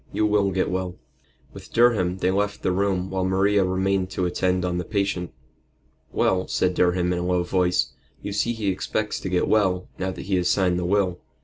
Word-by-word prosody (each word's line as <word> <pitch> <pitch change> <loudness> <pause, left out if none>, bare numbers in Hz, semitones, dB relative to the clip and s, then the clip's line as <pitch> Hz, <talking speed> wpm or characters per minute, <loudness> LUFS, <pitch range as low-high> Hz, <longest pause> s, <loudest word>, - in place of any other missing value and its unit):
You 110 - +1
will 105 -2 +2
get 95 -1 0
well." 90 -1 -2 0.6
With - - -12
Durham 105 -7 +3
they 95 0 +1
left 100 +1 -1
the 95 - +2
room 95 -1 0
while 95 -1 -1
Maria 95 +2 +2
remained 95 0 0
to 95 -1 -2
attend 90 +1 0
on 90 0 -1
the - - -2
patient. 100 -3 -2 0.8
"Well," 95 0 +1
said 90 0 +1
Durham, 90 0 +2
in 90 - -1
a - - -2
low 90 0 +1
voice, 90 0 +1 0.3
"you 100 - -4
see 115 +4 0
he 110 -3 -2
expects 105 +3 -2
to 95 - -4
get 90 -1 +1
well, 95 -4 +1
now 95 - -1
that 95 - -6
he 95 0 0
has 90 0 +1
signed 90 -2 +2
the 90 - -2
will. 95 -1 +1
95 Hz, 205 wpm, -24 LUFS, 90-100 Hz, 0.8 s, Durham